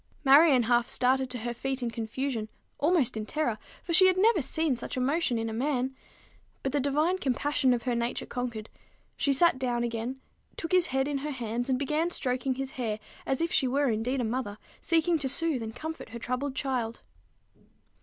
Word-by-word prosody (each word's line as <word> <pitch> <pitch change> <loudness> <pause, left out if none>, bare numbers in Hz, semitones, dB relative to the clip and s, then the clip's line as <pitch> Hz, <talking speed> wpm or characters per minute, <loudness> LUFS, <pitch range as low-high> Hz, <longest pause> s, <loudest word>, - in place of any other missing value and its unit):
Marion 275 -2 +7
half 240 +1 +2
started 260 +1 +2
to 250 - -2
her 240 +1 -3
feet 265 +2 -2
in 235 - -1
confusion, 230 0 -3 0.3
almost 310 -6 +2
in 215 - -3
terror, 260 -1 -1 0.3
for 340 - -3
she 370 +2 +8
had 370 0 +3
never 415 -2 +4
seen 305 +1 0
such 240 - -6
emotion 270 0 +1
in 225 0 -2
a 220 - -4
man; 260 +1 -1 0.7
but 270 - -1
the 290 - +1
divine 300 +7 +1
compassion 275 -1 +1
of 240 -1 0
her 250 - 0
nature 235 +1 -1
conquered: 235 -3 -4 0.5
she 280 - +1
sat 275 0 +4
down 240 -2 0
again, 235 +2 -3 0.4
took 330 - -4
his 365 -1 +4
head 265 +1 0
in 285 -1 -1
her 295 +2 -4
hands, 245 -2 -3
and 260 - +2
began 300 +5 0
stroking 255 -4 -1
his 270 0 -4
hair 220 -4 -3 0.3
as 265 +2 0
if 335 - 0
she 265 - +2
were 275 +2 +1
indeed 235 +5 -1
a - - 0
mother 225 -3 -3 0.2
seeking 330 0 +2
to 270 -2 -1
soothe 315 -2 0
and 225 0 -6
comfort 320 -2 -6
her 235 - -7
troubled 255 +3 -3
child. 255 -4 -2
260 Hz, 195 wpm, -28 LUFS, 240-295 Hz, 0.7 s, she